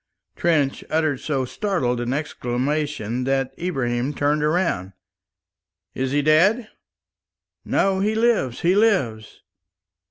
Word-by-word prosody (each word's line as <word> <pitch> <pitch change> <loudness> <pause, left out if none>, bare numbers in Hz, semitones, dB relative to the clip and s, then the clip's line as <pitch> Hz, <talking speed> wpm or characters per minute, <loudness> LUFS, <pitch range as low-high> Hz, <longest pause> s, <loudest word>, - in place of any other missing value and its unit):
Trench 150 -5 +1
uttered 155 -4 +1
so 135 -4 -1
startled 125 - -1
an 120 +1 -2
exclamation 135 -3 -2
that 135 -1 0
Ibrahim 135 -5 -1
turned 145 +2 +1
round. 150 - 0 1.0
"Is 130 0 -2
he 145 +2 +1
dead?" 195 - +3 0.9
"No, 195 -1 +1
he 210 +3 +1
lives, 220 - +1
he 175 +2 +3
lives." 185 - +1
145 Hz, 105 wpm, -22 LUFS, 125-180 Hz, 1.0 s, dead